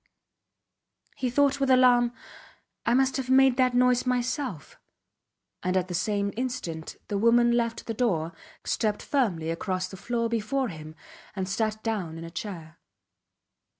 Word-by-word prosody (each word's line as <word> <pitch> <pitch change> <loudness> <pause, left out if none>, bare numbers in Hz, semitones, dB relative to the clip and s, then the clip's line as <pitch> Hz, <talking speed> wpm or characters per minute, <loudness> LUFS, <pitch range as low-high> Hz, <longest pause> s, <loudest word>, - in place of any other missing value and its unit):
He 255 - -1
thought 280 +2 +2
with 275 -1 +1
alarm: 250 -2 +5 0.8
I 235 - +4
must 265 +1 +2
have 260 -1 -4
made 265 -1 +5
that 255 -1 +3
noise 250 0 +4
myself; 250 - -2 0.8
and 185 +1 0
at 185 0 -1
the - - -4
same 200 +2 0
instant 195 -10 -4
the 200 - -1
woman 235 +2 +4
left 230 -1 0
the 225 - -3
door, 175 -9 0 0.3
stepped 210 -2 -1
firmly 180 - 0
across 185 +2 -2
the 190 - -9
floor 230 +4 -1
before 235 +3 -1
him, 155 -2 -9 0.4
and 190 -2 -2
sat 215 +2 -1
down 195 -8 -2
in 165 - -7
a 165 - -8
chair. 165 -3 -7
230 Hz, 150 wpm, -27 LUFS, 185-250 Hz, 0.8 s, alarm